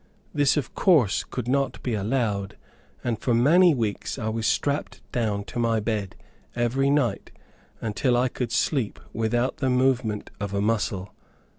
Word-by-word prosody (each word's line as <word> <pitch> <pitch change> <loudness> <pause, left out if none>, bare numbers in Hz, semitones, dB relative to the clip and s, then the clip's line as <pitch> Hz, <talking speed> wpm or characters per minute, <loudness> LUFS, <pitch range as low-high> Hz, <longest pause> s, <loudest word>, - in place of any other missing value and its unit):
This 145 0 +3
of 140 -6 -2
course 150 - +3
could 125 -2 -5
not 135 +1 0
be 125 - -1
allowed, 105 -2 -1 0.5
and 115 -3 -1
for 120 0 +1
many 165 +7 +5
weeks 110 -1 -2
I 110 -4 -2
was 110 0 -1
strapped 145 +1 -1
down 105 -4 -1
to 110 - -6
my 115 -1 +2
bed 105 -3 -2 0.4
every 125 +3 +1
night, 130 -8 +1 0.5
until 120 +3 +1
I 125 +1 +3
could 125 -1 -4
sleep 120 -1 0
without 120 +3 0
the 130 - 0
movement 125 -4 +1
of 100 -1 -3
a - - +1
muscle. 100 -3 -1
120 Hz, 155 wpm, -25 LUFS, 105-130 Hz, 0.5 s, many